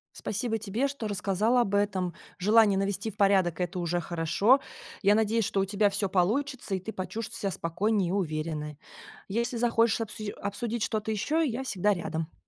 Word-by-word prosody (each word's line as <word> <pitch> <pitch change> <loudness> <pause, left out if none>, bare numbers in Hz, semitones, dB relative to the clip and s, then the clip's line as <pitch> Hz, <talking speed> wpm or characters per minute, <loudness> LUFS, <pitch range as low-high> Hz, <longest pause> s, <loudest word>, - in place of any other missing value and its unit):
Спасибо 225 +1 -2
тебе, 220 +6 -1
что 270 -6 -5
рассказала 205 +5 +1
об 205 -3 -1
этом. 190 -3 0 0.2
Желание 210 +1 +5
навести 195 +2 -1
в 210 - -21
порядок- 190 -4 +3
это 180 +1 -2
уже 175 0 0
хорошо. 175 - +3 0.4
Я 205 0 +5
надеюсь, 220 +1 +2
что 195 - -1
у 195 - +2
тебя 205 +1 +2
всё 200 0 0
получится 220 +5 0
и - - -2
ты 220 +5 -7
почувствуешь 215 +4 -5
себя 200 - -1
спокойнее 185 +3 0
и - - -1
уверенной. 155 -5 -2 0.5
Если 235 +4 -1
захочешь 230 -1 +2
обсуж 215 -1 -4
обсудить 215 +3 -2
что-то 215 -1 -2
еще, 300 +10 +1
я 255 0 -2
всегда 210 -4 +1
рядом. 165 -1 -4
205 Hz, 175 wpm, -28 LUFS, 185-225 Hz, 0.5 s, Желание